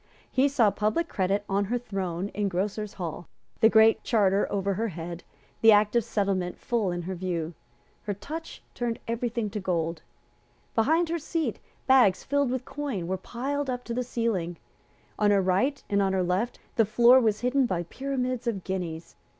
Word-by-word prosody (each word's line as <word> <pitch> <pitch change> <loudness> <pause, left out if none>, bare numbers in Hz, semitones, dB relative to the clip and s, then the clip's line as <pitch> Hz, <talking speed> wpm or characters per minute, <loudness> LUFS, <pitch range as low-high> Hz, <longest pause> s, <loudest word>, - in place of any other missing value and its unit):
He 265 +2 +3
saw 240 -7 +3
Public 215 +13 0
Credit 195 - 0
on 200 0 +1
her 240 +5 0
throne 195 -5 -3
in 205 -1 -1
Grocers' 200 +3 -2
Hall, 175 -2 -5 0.3
the 225 - +6
Great 220 0 +5
Charter 200 -3 +2
over 200 0 0
her 225 +4 -1
head, 170 -2 -6 0.4
the 225 - +8
Act 210 +1 +4
of 235 - +4
Settlement 195 -4 -1
full 225 -6 -1
in 175 0 -3
her 190 +3 -4
view. 175 -2 -3 0.5
Her 205 -1 -2
touch 320 - -8
turned 235 -1 -2
every 235 +1 -1
thing 225 -3 -3
to 210 - -3
gold. 165 -4 -1 0.7
Behind 320 +9 +3
her 335 0 -1
seat, 310 -5 -2 0.3
bags 260 -8 +5
filled 285 -1 +1
with 255 0 -2
coin 275 -12 -4
were 185 +2 -1
piled 270 +8 -3
up 250 -1 -3
to 235 - -5
the 250 - -1
ceiling. 215 -8 -2 0.6
On 210 -1 +4
her 200 -1 +4
right 195 +10 +1
and 200 -1 +2
on 195 -1 +1
her 190 -1 +1
left 185 +7 -1 0.2
the 225 - +5
floor 240 +4 +6
was 220 -3 +1
hidden 250 +1 +2
by 175 -4 -1
pyramids 255 +4 -3
of 200 -6 -1
guineas. 175 -4 -5
210 Hz, 185 wpm, -27 LUFS, 185-245 Hz, 0.7 s, the